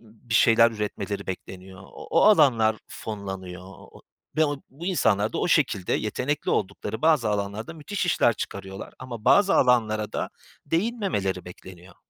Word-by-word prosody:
bir 115 Hz, +1 st, -9 dB
şeyler 115 Hz, 0 st, +6 dB
üretmeleri 105 Hz, -2 st, -4 dB
bekleniyor. 95 Hz, 0 st, -8 dB
O -, -, -12 dB
o -, -, +4 dB
alanlar 125 Hz, -, +5 dB
fonlanıyor 95 Hz, -4 st, -7 dB
o 95 Hz, -1 st, -14 dB
o -, -, -16 dB, 0.3 s
ve 155 Hz, -, +4 dB
o 145 Hz, -2 st, -2 dB
bu 160 Hz, +7 st, -9 dB
insanlar 110 Hz, -, +1 dB
da -, -, -2 dB
o -, -, 0 dB
şekilde 105 Hz, -, +1 dB
yetenekli 130 Hz, +7 st, -1 dB
oldukları 105 Hz, +2 st, -2 dB
bazı 155 Hz, -8 st, +3 dB
alanlarda 105 Hz, +6 st, -3 dB
müthiş 180 Hz, +4 st, -3 dB
işler 120 Hz, -, +3 dB
çıkarıyorlar 95 Hz, -2 st, -7 dB
ama 120 Hz, -4 st, -8 dB
bazı 200 Hz, -1 st, +5 dB
alanlara 110 Hz, -4 st, +2 dB
da -, -, -3 dB, 0.4 s
değinmemeleri 165 Hz, -, -1 dB
bekleniyor. 90 Hz, 0 st, -13 dB
110 Hz, 150 wpm, -25 LUFS, 95-145 Hz, 0.4 s, şeyler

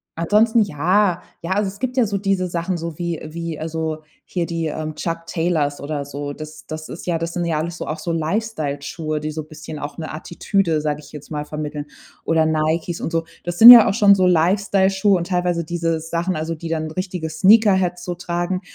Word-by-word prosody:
ansonsten 215 Hz, +7 st, +3 dB
ja, 180 Hz, +2 st, +1 dB, 0.2 s
ja, 170 Hz, -, -5 dB
also, 205 Hz, +1 st, +1 dB
es 195 Hz, +1 st, -8 dB
gibt 255 Hz, +2 st, -2 dB
ja 250 Hz, -, +4 dB
so 200 Hz, -1 st, -2 dB
diese 195 Hz, -2 st, 0 dB
Sachen, 175 Hz, +1 st, -2 dB
so 165 Hz, -2 st, -6 dB
wie 170 Hz, -2 st, -2 dB
wie, 165 Hz, 0 st, -5 dB
also, 160 Hz, -1 st, -3 dB, 0.3 s
hier 175 Hz, -2 st, -1 dB
die, 165 Hz, -1 st, -2 dB
ähm, 155 Hz, 0 st, -4 dB
Chuck 165 Hz, +1 st, -4 dB
Taylors 160 Hz, -4 st, -1 dB
oder 145 Hz, 0 st, -4 dB
so. 145 Hz, 0 st, -5 dB
Das 155 Hz, 0 st, -10 dB
das 155 Hz, 0 st, -6 dB
ist 175 Hz, -, -9 dB
ja 170 Hz, -2 st, +1 dB
das 165 Hz, +1 st, -4 dB
sind 175 Hz, -1 st, -2 dB
ja 165 Hz, -2 st, 0 dB
alles 165 Hz, +3 st, -3 dB
so -, -, -6 dB
auch 155 Hz, -, -3 dB
so 170 Hz, -, -3 dB
Lifestyle-Schuhe, 155 Hz, -4 st, -2 dB
die 155 Hz, +1 st, -4 dB
so 155 Hz, +1 st, -4 dB
'n 150 Hz, -, -13 dB
bisschen 155 Hz, -1 st, -9 dB
auch 145 Hz, 0 st, -6 dB
'ne 160 Hz, -2 st, -6 dB
Attitüde, 170 Hz, +1 st, -1 dB
sage 150 Hz, -1 st, -2 dB
ich 145 Hz, -1 st, -14 dB
jetzt 150 Hz, 0 st, -11 dB
mal, 150 Hz, -1 st, -3 dB
vermitteln. 150 Hz, -1 st, -5 dB, 0.4 s
Oder 160 Hz, -1 st, +3 dB
Nikes 160 Hz, +2 st, 0 dB
und -, -, -3 dB
so. 165 Hz, -1 st, -1 dB, 0.2 s
Das 175 Hz, 0 st, -4 dB
sind 230 Hz, +5 st, +12 dB
ja 235 Hz, -3 st, +10 dB
auch -, -, 0 dB
schon 205 Hz, -2 st, +6 dB
so 185 Hz, -2 st, +3 dB
Lifestyle-Schuhe 190 Hz, +3 st, +3 dB
und 170 Hz, 0 st, -4 dB
teilweise 180 Hz, -2 st, 0 dB
diese 165 Hz, 0 st, -1 dB
Sachen, 170 Hz, +3 st, -2 dB
also, 160 Hz, +2 st, -3 dB
die 165 Hz, +1 st, -7 dB
dann 160 Hz, -1 st, -2 dB
richtige 180 Hz, -1 st, -4 dB
Sneakerheads 190 Hz, +1 st, +4 dB
so 180 Hz, -, -3 dB
tragen. 175 Hz, +1 st, -2 dB
165 Hz, 215 wpm, -21 LUFS, 155-185 Hz, 0.4 s, sind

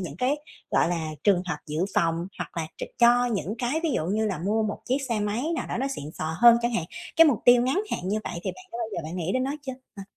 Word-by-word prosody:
những 165 Hz, -5 st, -6 dB
cái, 260 Hz, +7 st, +1 dB, 0.3 s
gọi -, -, +3 dB
là, 165 Hz, -2 st, -2 dB, 0.2 s
trường 190 Hz, -3 st, +4 dB
hợp -, -, -2 dB
dự 155 Hz, +4 st, -1 dB
phòng, 165 Hz, +1 st, +1 dB
hoặc -, -, -6 dB
là 160 Hz, -1 st, -1 dB
tr -, -, -3 dB
cho 245 Hz, +1 st, +5 dB
những 205 Hz, -4 st, -2 dB
cái 255 Hz, +7 st, 0 dB
ví 330 Hz, -, +1 dB
dụ 155 Hz, -, 0 dB
như 215 Hz, +3 st, +1 dB
là 195 Hz, -5 st, -2 dB
mua 210 Hz, +6 st, 0 dB
một 210 Hz, -1 st, -3 dB
chiếc 260 Hz, +3 st, +2 dB
xe 230 Hz, -3 st, 0 dB
máy 210 Hz, +4 st, -1 dB
nào -, -, -3 dB
đó -, -, -3 dB
nó 265 Hz, +3 st, -1 dB
xịn 150 Hz, -, -5 dB
xò 160 Hz, +1 st, -3 dB
hơn 235 Hz, 0 st, +8 dB
chẳng 240 Hz, -, +1 dB
hạn? 170 Hz, -, 0 dB, 0.3 s
Cái 330 Hz, -, +8 dB
mục 270 Hz, -8 st, +3 dB
tiêu 245 Hz, 0 st, +7 dB
ngắn 270 Hz, +11 st, +1 dB
hạn -, -, -1 dB
như 210 Hz, +2 st, +1 dB
vậy 170 Hz, -, -5 dB
thì -, -, 0 dB
bạn 370 Hz, -, -13 dB
đã 230 Hz, -, -5 dB
bao 230 Hz, -, -1 dB
giờ -, -, -3 dB
bạn 165 Hz, +4 st, -5 dB
nghĩ 180 Hz, +1 st, -2 dB
đến 255 Hz, 0 st, +1 dB
nó 275 Hz, -, -1 dB
chưa 265 Hz, -, -4 dB, 0.2 s
hả? 195 Hz, -, -6 dB
215 Hz, 290 wpm, -26 LUFS, 175-245 Hz, 0.3 s, hơn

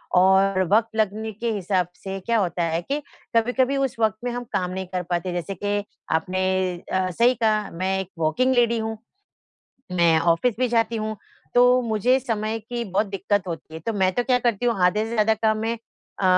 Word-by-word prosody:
और 190 Hz, +1 st, +4 dB
वक़्त 225 Hz, 0 st, +2 dB
लगने 220 Hz, +1 st, -1 dB
के 230 Hz, +3 st, -3 dB
हिसाब 185 Hz, -3 st, 0 dB
से 195 Hz, 0 st, -6 dB
क्या 230 Hz, +4 st, 0 dB
होता 175 Hz, -3 st, 0 dB
है 165 Hz, 0 st, 0 dB
कि 280 Hz, +11 st, -2 dB, 0.4 s
कभी-कभी 250 Hz, +4 st, +2 dB
उस 270 Hz, -2 st, 0 dB
वक़्त 220 Hz, -1 st, +2 dB
में 245 Hz, -, -1 dB
हम 245 Hz, 0 st, -4 dB
काम 180 Hz, -1 st, 0 dB
नहीं 190 Hz, 0 st, -4 dB
कर 180 Hz, -1 st, -3 dB
पाते, 175 Hz, +1 st, -1 dB
जैसे 175 Hz, +3 st, -4 dB
कि 205 Hz, +1 st, -1 dB, 0.3 s
आपने 185 Hz, +3 st, -1 dB, 0.5 s
अ, 185 Hz, 0 st, +1 dB
सही 235 Hz, +8 st, +4 dB
कहा 215 Hz, -3 st, +1 dB
मैं 190 Hz, +3 st, -1 dB
एक 190 Hz, -1 st, -5 dB
वर्किंग 250 Hz, +12 st, +2 dB
लेडी 235 Hz, -1 st, +3 dB
हूँ, 220 Hz, 0 st, -3 dB, 1.0 s
मैं 170 Hz, -2 st, +4 dB
ऑफ़िस 175 Hz, +8 st, +2 dB
भी 255 Hz, -1 st, +2 dB
जाती 230 Hz, 0 st, +1 dB
हूँ, 215 Hz, 0 st, -3 dB, 0.4 s
तो 245 Hz, +1 st, +6 dB
मुझे 235 Hz, +3 st, +2 dB
समय 225 Hz, -3 st, -2 dB
की 235 Hz, +2 st, -5 dB
बहुत 200 Hz, +2 st, 0 dB
दिक़्क़त 195 Hz, 0 st, -1 dB
होती 160 Hz, -1 st, -7 dB
है, 160 Hz, -, -6 dB
तो 225 Hz, +8 st, -3 dB
मैं 190 Hz, -2 st, +2 dB
तो 245 Hz, -, +1 dB
क्या 250 Hz, 0 st, +3 dB
करती 240 Hz, -2 st, 0 dB
हूँ 235 Hz, -3 st, +2 dB
आधे 210 Hz, +4 st, +3 dB
से 225 Hz, -, -6 dB
ज़्यादा 220 Hz, 0 st, +3 dB
काम 220 Hz, 0 st, +1 dB
मैं 225 Hz, +2 st, -1 dB, 0.4 s
अ, -, -, -1 dB
215 Hz, 200 wpm, -23 LUFS, 185-235 Hz, 1.0 s, तो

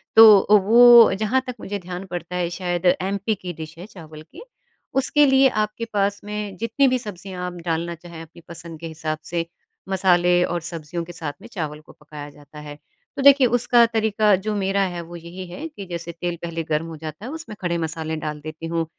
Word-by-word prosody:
तो 220 Hz, -2 st, +10 dB
अ, 205 Hz, -, +1 dB
वो 235 Hz, +2 st, +7 dB
जहाँ 215 Hz, +6 st, 0 dB
तक 250 Hz, -, -5 dB
मुझे 205 Hz, 0 st, -5 dB
ध्यान 180 Hz, +1 st, -7 dB
पड़ता 175 Hz, -1 st, -6 dB
है 175 Hz, -1 st, -1 dB
शायद 175 Hz, -1 st, -2 dB, 0.2 s
एमपी 200 Hz, +3 st, -1 dB
की 180 Hz, -2 st, -7 dB
डिश 160 Hz, 0 st, -9 dB
है 175 Hz, -, -9 dB
चावल 160 Hz, -7 st, -12 dB
की, 295 Hz, -, -14 dB, 0.5 s
उसके 290 Hz, +2 st, +3 dB
लिए 265 Hz, -1 st, +5 dB
आपके 215 Hz, +2 st, -3 dB
पास 200 Hz, 0 st, 0 dB
में 210 Hz, -1 st, -5 dB
जितनी 230 Hz, +7 st, +1 dB
भी 255 Hz, 0 st, +2 dB
सब्ज़ियाँ 190 Hz, -4 st, -7 dB
आप 180 Hz, -, -6 dB
डालना 170 Hz, 0 st, -2 dB
चाहे 170 Hz, -1 st, -11 dB
अपनी 165 Hz, +1 st, -14 dB
पसंद 170 Hz, -1 st, -10 dB
के 165 Hz, -, -6 dB
हिसाब 155 Hz, -1 st, -4 dB
से, 170 Hz, 0 st, -3 dB, 0.4 s
मसाले 180 Hz, -2 st, +3 dB
और 175 Hz, -1 st, -2 dB
सब्जियों 165 Hz, 0 st, -6 dB
के 175 Hz, +1 st, -10 dB
साथ 160 Hz, -4 st, -5 dB
में -, -, -11 dB
चावल 155 Hz, -6 st, -5 dB
को -, -, -17 dB
पकाया 150 Hz, -1 st, -11 dB
जाता 145 Hz, +1 st, -15 dB
है। 150 Hz, -1 st, -9 dB, 0.4 s
तो -, -, -3 dB
देखिए, 275 Hz, -2 st, +7 dB
उसका 240 Hz, 0 st, +4 dB
तरीका 220 Hz, -2 st, +2 dB
जो 205 Hz, +3 st, -3 dB
मेरा 195 Hz, 0 st, 0 dB
है 175 Hz, -3 st, -2 dB
वो 170 Hz, +1 st, -11 dB
यही 170 Hz, +2 st, -9 dB
है 230 Hz, -, -7 dB
कि 295 Hz, -11 st, -10 dB
जैसे 170 Hz, -1 st, -6 dB
तेल 175 Hz, +1 st, -4 dB
पहले 165 Hz, -1 st, -4 dB
गर्म 155 Hz, 0 st, -1 dB
हो 165 Hz, -, -8 dB
जाता 155 Hz, +6 st, -8 dB
है 255 Hz, -, -6 dB
उसमें 320 Hz, -8 st, -8 dB
खड़े 175 Hz, -2 st, -1 dB
मसाले 160 Hz, -1 st, -3 dB
डाल 150 Hz, -1 st, -5 dB
देती 155 Hz, +2 st, -8 dB
हूँ, 165 Hz, 0 st, -1 dB
180 Hz, 210 wpm, -22 LUFS, 165-210 Hz, 0.5 s, तो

